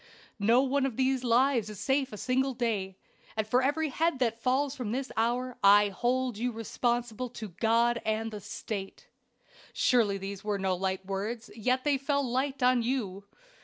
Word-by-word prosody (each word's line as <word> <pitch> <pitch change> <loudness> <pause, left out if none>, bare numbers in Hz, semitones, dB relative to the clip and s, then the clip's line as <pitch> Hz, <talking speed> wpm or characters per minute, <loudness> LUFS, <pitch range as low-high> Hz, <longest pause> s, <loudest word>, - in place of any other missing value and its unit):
No 230 +6 +4
one 275 0 +1
of 245 - -6
these 260 -1 +1
lives 240 -2 +3
is 210 -3 -8
safe 270 -1 0
a 210 - -7
single 260 +3 0
day; 205 -6 -2 0.4
and 220 - +1
for 245 +4 +2
every 295 +4 +1
head 325 +1 0
that 230 -3 -1
falls 270 +3 +1
from 245 -6 -4
this 260 +2 -3
hour 245 +2 -1
I 205 +1 +7
hold 245 +3 -1
you 245 +1 0
responsible 240 +1 -2
to 220 -3 -7
God 230 +5 +2
and 220 +1 -1
the 210 -1 -7
State.' 200 0 -6 0.6
"Surely 225 -6 +3
these 195 0 -6
were 210 -1 -1
no 190 -1 0
light 190 +1 -2
words, 205 +4 -4
yet 255 +3 0
they 285 -2 +2
fell 280 0 0
light 265 +2 -1
on 250 -1 +4
you. 215 -6 -2
240 Hz, 175 wpm, -29 LUFS, 210-260 Hz, 0.6 s, I